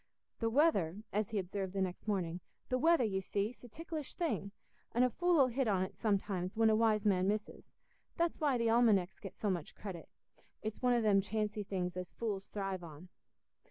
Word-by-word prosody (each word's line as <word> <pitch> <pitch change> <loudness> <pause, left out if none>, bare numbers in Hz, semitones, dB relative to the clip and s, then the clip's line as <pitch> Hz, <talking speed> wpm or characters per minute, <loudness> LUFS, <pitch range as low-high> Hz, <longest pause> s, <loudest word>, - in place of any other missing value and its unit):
"The 230 - +1
weather"—as 215 - +1
he 220 - -2
observed 190 0 -3
the 195 - -1
next 185 +3 -5
morning—"the 185 +5 -3
weather, 330 0 +5
you 195 -4 0
see, 200 +3 -1
's - - -22
a - - -9
ticklish 315 +2 -6
thing, 305 - -1 0.4
an' 240 - +4
a 250 - +3
fool 350 +1 +2
'ull 265 - +6
hit 255 +1 0
on't 190 -3 0
sometimes 195 -3 -1
when 225 -1 +5
a - - +4
wise 215 -1 +2
man 190 -2 +3
misses; 210 +1 -3 0.5
that's 340 -1 0
why 285 -4 +3
the 230 -1 +1
almanecks 220 -6 +3
get 195 - -9
so 205 - 0
much 170 -4 -4
credit. 190 -5 -7 0.5
It's 215 0 -4
one 250 -1 +4
o' 240 - +3
them 200 -2 +5
chancy 210 +1 -2
things 185 -3 -3
as 180 -1 -6
fools 205 -4 -3
thrive 195 -3 -3
on." 165 +2 -11
210 Hz, 195 wpm, -34 LUFS, 190-235 Hz, 0.5 s, ull